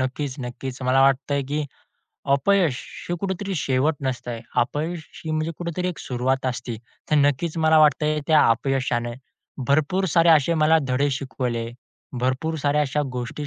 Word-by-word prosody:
नक्कीच-नक्कीच. 130 Hz, -1 st, -4 dB
मला 130 Hz, +1 st, +3 dB
वाटतंय 135 Hz, +1 st, +2 dB
की 150 Hz, +1 st, -1 dB, 0.7 s
अपयश 150 Hz, -1 st, +2 dB, 0.3 s
हे 175 Hz, -, 0 dB
कुठेतरी 195 Hz, 0 st, -3 dB
शेवट 140 Hz, +1 st, +1 dB
नसतंय. 125 Hz, -3 st, -3 dB, 0.2 s
अपयश 155 Hz, +7 st, -1 dB, 0.2 s
ही 160 Hz, -, -3 dB
म्हणजे 155 Hz, +1 st, -1 dB
कुठेतरी 175 Hz, +1 st, -2 dB
एक 180 Hz, -, -5 dB
सुरुवात 130 Hz, +1 st, -1 dB
असते. 120 Hz, -2 st, -3 dB, 0.3 s
तर -, -, +4 dB
नक्कीच 145 Hz, +3 st, +1 dB
मला 160 Hz, 0 st, +5 dB
वाटतंय, 150 Hz, 0 st, +3 dB
त्या 155 Hz, -2 st, +5 dB
अपयशाने 120 Hz, -1 st, 0 dB, 0.5 s
भरपूर 155 Hz, +7 st, +2 dB
सारे 170 Hz, +1 st, +4 dB
असे 160 Hz, 0 st, +5 dB
मला 155 Hz, +1 st, +4 dB
धडे 135 Hz, +3 st, +2 dB
शिकवले, 125 Hz, -4 st, -3 dB, 0.5 s
भरपूर 130 Hz, +6 st, -1 dB
साऱ्या 145 Hz, +1 st, +1 dB
अशा 150 Hz, +1 st, 0 dB
गोष्टी 125 Hz, +4 st, -4 dB
145 Hz, 145 wpm, -23 LUFS, 130-160 Hz, 0.7 s, मला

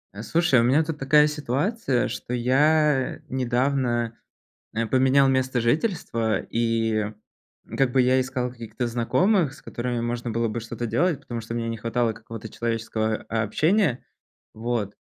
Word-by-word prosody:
А, 105 Hz, -, -6 dB
слушай, 165 Hz, -1 st, +3 dB
у -, -, +3 dB
меня 135 Hz, +7 st, +4 dB
тут 155 Hz, -1 st, -5 dB
такая 150 Hz, +2 st, +5 dB
ситуация, 150 Hz, -, -1 dB
что 125 Hz, -, -4 dB
я 145 Hz, +3 st, +2 dB
недавно, 125 Hz, -2 st, 0 dB, 0.6 s
э, 115 Hz, +1 st, 0 dB
поменял 130 Hz, +2 st, +4 dB
место 130 Hz, -1 st, +1 dB
жительства, 120 Hz, -, 0 dB
и 115 Hz, -2 st, 0 dB, 0.7 s
как 135 Hz, -2 st, +2 dB
бы 130 Hz, -, +2 dB
я 130 Hz, +1 st, +3 dB
искал 125 Hz, -1 st, -3 dB
каких-то 120 Hz, 0 st, -5 dB
знакомых, 145 Hz, -, +2 dB
с -, -, -16 dB
которыми 120 Hz, 0 st, -3 dB
можно 120 Hz, 0 st, -3 dB
было 115 Hz, +1 st, 0 dB
бы 115 Hz, -, -3 dB
что-то 115 Hz, +1 st, -5 dB
делать, 145 Hz, +7 st, +1 dB
потому 120 Hz, -3 st, -5 dB
что 115 Hz, +1 st, -6 dB
мне 115 Hz, -1 st, -2 dB
не 115 Hz, -, -3 dB
хватало 115 Hz, +1 st, 0 dB
какого-то 115 Hz, 0 st, -9 dB
человеческого, 110 Hz, -1 st, -2 dB
а, 110 Hz, 0 st, 0 dB
общения. 155 Hz, -, +1 dB, 0.5 s
Вот, 110 Hz, -3 st, -2 dB
120 Hz, 150 wpm, -24 LUFS, 115-135 Hz, 0.7 s, такая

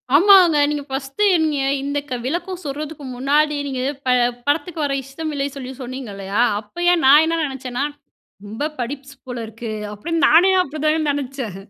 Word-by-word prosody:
ஆமாங்க. 360 Hz, -2 st, +7 dB
நீங்க 295 Hz, -1 st, -2 dB
1 270 Hz, +6 st, -5 dB, 0.2 s
நீங்க 300 Hz, -2 st, 0 dB, 0.2 s
இந்த 285 Hz, +1 st, -2 dB
க -, -, -3 dB
விளக்கம் 345 Hz, +5 st, -3 dB
சொல்றதுக்கு 290 Hz, +1 st, -6 dB
முன்னாடி, 295 Hz, +3 st, +2 dB
நீங்க 260 Hz, -2 st, -3 dB, 0.2 s
ப -, -, -5 dB, 0.4 s
படத்துக்கு 320 Hz, +1 st, -1 dB
வர 275 Hz, -, -1 dB
இஷ்டம் 305 Hz, +4 st, -6 dB
இல்லை 280 Hz, 0 st, -1 dB
சொல்லி 260 Hz, -1 st, -7 dB
சொன்னீங்கல்லையா? 215 Hz, -5 st, -4 dB, 0.2 s
அப்பயே 350 Hz, +11 st, +1 dB
நான் 295 Hz, +4 st, +8 dB
என்ன 330 Hz, 0 st, 0 dB
நெனைச்சேன்னா, 265 Hz, -1 st, -4 dB, 0.6 s
"ரொம்ப 255 Hz, +9 st, -3 dB
படிப்ஸ் 275 Hz, +2 st, -6 dB
போல 245 Hz, -1 st, -5 dB
இருக்கு." 225 Hz, 0 st, -7 dB, 0.2 s
அப்படின்னு 330 Hz, +10 st, -1 dB
நானே 360 Hz, +5 st, +6 dB
அப்படி 300 Hz, -1 st, -7 dB
தாங்க 310 Hz, -1 st, +1 dB
நினைச்சேன். 265 Hz, -7 st, -5 dB
280 Hz, 155 wpm, -20 LUFS, 260-315 Hz, 0.6 s, நான்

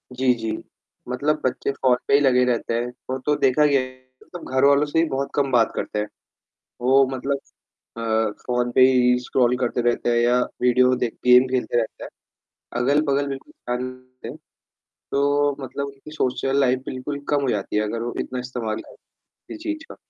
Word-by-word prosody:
जी, 130 Hz, 0 st, +3 dB
जी, 115 Hz, -2 st, -4 dB, 0.6 s
मतलब 150 Hz, +4 st, 0 dB
बच्चे 130 Hz, +2 st, -1 dB
फ़ोन 130 Hz, -2 st, +2 dB
पे -, -, +1 dB
ही 140 Hz, -, +7 dB
लगे 130 Hz, -3 st, +4 dB
रहते 120 Hz, -1 st, -1 dB
हैं, 120 Hz, +1 st, -1 dB, 0.2 s
वो 130 Hz, -, -1 dB
तो 150 Hz, 0 st, +2 dB
देखा 135 Hz, +3 st, +3 dB
गया 140 Hz, -2 st, +4 dB
है 130 Hz, -, -6 dB, 0.3 s
मतलब 175 Hz, -, -10 dB
घरवालों 140 Hz, +2 st, +4 dB
से 155 Hz, +2 st, +1 dB
भी 165 Hz, -, +1 dB
बहुत 135 Hz, +1 st, -2 dB
कम 140 Hz, -2 st, +1 dB
बात 120 Hz, -3 st, +3 dB
करते 105 Hz, -, -3 dB
हैं, 105 Hz, -, -2 dB, 0.7 s
वो 135 Hz, +2 st, +4 dB
मतलब 135 Hz, +2 st, -2 dB, 0.6 s
अ, -, -, -6 dB, 0.5 s
फ़ोन 125 Hz, -1 st, 0 dB
पे 130 Hz, -, +3 dB
ही 125 Hz, -1 st, +3 dB
स्क्रॉल 125 Hz, 0 st, +1 dB
करते 125 Hz, -1 st, -1 dB
रहते 120 Hz, 0 st, +1 dB
हैं 120 Hz, -, +2 dB
या 120 Hz, +1 st, +3 dB, 0.2 s
विडियो 125 Hz, +1 st, +4 dB
देख 120 Hz, -2 st, -2 dB
गेम 125 Hz, +1 st, +7 dB
खेलते 125 Hz, -1 st, -1 dB
रहते 110 Hz, -, -3 dB
हैं। -, -, -9 dB, 0.7 s
अगल-बगल 140 Hz, +1 st, +2 dB
बिल्कुल 135 Hz, -1 st, -7 dB
ध्यान 125 Hz, +1 st, -4 dB
नहीं 130 Hz, -, -4 dB, 0.4 s
देते, -, -, -10 dB, 0.8 s
तो 145 Hz, 0 st, +2 dB
मतलब 140 Hz, +1 st, -4 dB
उनकी 140 Hz, +2 st, -12 dB
सोशल 135 Hz, -2 st, -1 dB
लाइफ 130 Hz, -1 st, +2 dB
बिल्कुल 140 Hz, +3 st, -5 dB
कम 145 Hz, -1 st, +2 dB
हो 135 Hz, -, 0 dB
जाती 105 Hz, 0 st, -2 dB
है 105 Hz, -, +3 dB
अगर 115 Hz, +2 st, -3 dB
वो 120 Hz, -, -4 dB
इतना 125 Hz, -, -4 dB
इस्तेमाल 120 Hz, -3 st, -4 dB
करें, -, -, -14 dB, 0.5 s
किसी -, -, -7 dB
चीज़ 320 Hz, -1 st, -4 dB
का। -, -, -10 dB
130 Hz, 190 wpm, -23 LUFS, 125-140 Hz, 0.8 s, ही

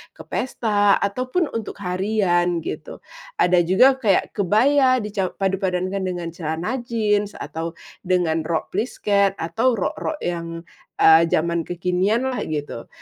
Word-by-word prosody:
ke -, -, -11 dB
pesta 205 Hz, -5 st, +1 dB
ataupun 255 Hz, -, -1 dB
untuk 225 Hz, -2 st, -5 dB
harian, 180 Hz, -3 st, 0 dB
gitu. -, -, -7 dB, 0.3 s
Ada 180 Hz, -, +3 dB
juga 260 Hz, +9 st, +5 dB
kayak 205 Hz, -7 st, +1 dB
kebaya 255 Hz, +5 st, +3 dB
di 210 Hz, -, -5 dB
ca 195 Hz, -2 st, -1 dB
padupadankan 190 Hz, -1 st, -1 dB
dengan 175 Hz, -2 st, -3 dB
celana 170 Hz, +9 st, -3 dB
jeans, 210 Hz, -4 st, -1 dB
atau 165 Hz, +1 st, -6 dB, 0.3 s
dengan 175 Hz, -3 st, +1 dB
rok 165 Hz, -1 st, -2 dB
plisket, 200 Hz, -2 st, +1 dB
atau 225 Hz, +11 st, 0 dB
rok-rok 225 Hz, -, -3 dB
yang, 165 Hz, -1 st, -4 dB, 0.4 s
eee, 160 Hz, +1 st, +7 dB
zaman 170 Hz, +1 st, 0 dB
kekinian 180 Hz, +7 st, 0 dB
lah, 250 Hz, -, -3 dB
gitu. 150 Hz, -2 st, -5 dB
190 Hz, 130 wpm, -22 LUFS, 175-220 Hz, 0.4 s, eee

